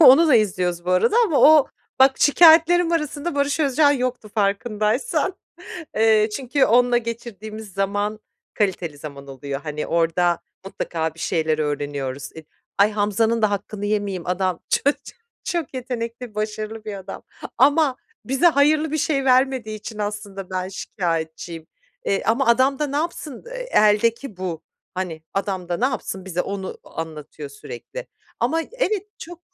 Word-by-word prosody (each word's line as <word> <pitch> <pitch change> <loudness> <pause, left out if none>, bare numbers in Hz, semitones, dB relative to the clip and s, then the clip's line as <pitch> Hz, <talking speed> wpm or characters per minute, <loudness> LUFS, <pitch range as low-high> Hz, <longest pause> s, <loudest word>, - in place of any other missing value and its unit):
Onu 310 +2 +8
da 275 - +6
izliyoruz 180 -5 +1
bu 180 - -1
arada 415 - +3
ama 315 -8 +2
o 305 -2 +7 0.3
Bak 265 0 +6
şikâyetlerim 335 +2 +6
arasında 300 0 -2
Barış 285 +2 0
Özcan 290 0 +4
yoktu 250 -5 -3
farkındaysan. 215 - 0 0.6
Eee, 220 -1 +4
çünkü 270 +1 +1
onunla 245 +1 +4
geçirdiğimiz 220 -3 -7
zaman 205 +2 -1 0.3
kaliteli 180 -7 -1
zaman 140 -2 -9
oluyor. 135 +1 -6
Hani 150 0 -4
orada 170 +1 +1 0.2
mutlaka 160 -4 -3
bir - - -20
şeyler 160 -2 0
öğreniyoruz. 145 -2 -3
Eee 160 - -10 0.3
Ay 205 +2 +5
Hamza'nın 215 +2 +1
da 215 - +4
hakkını 205 0 -4
yemeyeyim 205 -4 -2
adam 185 0 -1
ç - - +2
ço 285 - +6 0.5
çok 340 -6 -3
yetenekli 240 -2 -5
başarılı 215 +1 -4
bir 215 -2 -5
adam 195 0 -8 0.4
ama 290 -2 +4 0.3
bize 270 +7 +2
hayırlı 305 0 +3
bir 315 - 0
şey 275 -2 0
vermediği 255 -4 +2
için 215 +1 -8
aslında 205 -2 -5
ben 185 0 -2
şikâyetçiyim. 165 -3 -4 0.4
Eee, 195 - 0
ama 235 +5 +2
adam 260 +3 +3
da 300 - 0
ne 285 0 -3
yapsın, 305 - -4
eee, - - -6
eldeki 215 +2 +3
bu. 175 -3 -4 0.3
Hani 180 -4 -4
adam 190 -2 -2
da 175 - 0
ne 240 - 0
yapsın 245 -7 -2
bize 180 -2 -2
onu 195 -1 -5
a - - -16
anlatıyor 150 -2 -9
sürekli 470 - -9 0.3
ama 325 +1 +1
evet 425 -1 -2
çok 345 +1 -10
215 Hz, 150 wpm, -22 LUFS, 185-275 Hz, 0.6 s, Onu